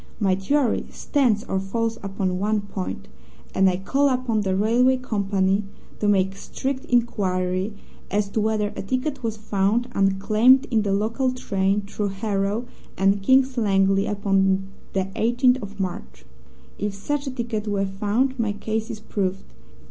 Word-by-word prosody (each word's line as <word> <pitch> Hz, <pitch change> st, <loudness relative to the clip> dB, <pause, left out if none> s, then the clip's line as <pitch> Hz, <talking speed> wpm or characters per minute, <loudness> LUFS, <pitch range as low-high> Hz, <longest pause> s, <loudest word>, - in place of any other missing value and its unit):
My 195 Hz, -4 st, +3 dB
theory 240 Hz, +7 st, +1 dB
stands 240 Hz, -8 st, +1 dB
or 190 Hz, -, -1 dB
falls 225 Hz, +4 st, -2 dB
upon 190 Hz, -2 st, -2 dB
one 210 Hz, +1 st, +1 dB
point, 95 Hz, -, -5 dB, 0.5 s
and 190 Hz, 0 st, +4 dB
I 180 Hz, -, 0 dB
call 275 Hz, +9 st, +2 dB
upon 250 Hz, -4 st, 0 dB
the 190 Hz, -2 st, 0 dB
railway 240 Hz, +6 st, +3 dB
company 200 Hz, -4 st, 0 dB, 0.4 s
to 210 Hz, -, 0 dB
make 195 Hz, -1 st, +2 dB
strict 265 Hz, +6 st, -4 dB
inquiry 195 Hz, -4 st, 0 dB, 0.3 s
as 205 Hz, 0 st, 0 dB
to 215 Hz, -, -1 dB
whether 215 Hz, -1 st, +1 dB
a -, -, -4 dB
ticket 260 Hz, +7 st, -2 dB
was 225 Hz, -2 st, -3 dB
found 215 Hz, +3 st, 0 dB
unclaimed 215 Hz, +7 st, +4 dB
in 225 Hz, -2 st, +3 dB
the 205 Hz, -1 st, -1 dB
local 225 Hz, +6 st, +1 dB
train 200 Hz, -5 st, 0 dB
through 205 Hz, +1 st, -3 dB
Harrow 200 Hz, +3 st, -1 dB, 0.3 s
and 195 Hz, +1 st, +3 dB
King's 260 Hz, +3 st, +3 dB
Langley 195 Hz, -2 st, +3 dB
upon 195 Hz, -2 st, +1 dB, 0.2 s
the 195 Hz, -, +1 dB
18th 250 Hz, +3 st, +3 dB
of 205 Hz, 0 st, -9 dB
March. 65 Hz, -, -5 dB, 0.5 s
If 205 Hz, -1 st, -2 dB
such 280 Hz, +8 st, -3 dB
a -, -, -2 dB
ticket 230 Hz, -4 st, -3 dB
were 200 Hz, -1 st, 0 dB
found 210 Hz, +7 st, 0 dB
my 220 Hz, -3 st, 0 dB
case 220 Hz, +2 st, -3 dB
is 220 Hz, -2 st, -5 dB
proved. 195 Hz, -3 st, -3 dB
205 Hz, 155 wpm, -23 LUFS, 195-235 Hz, 0.5 s, and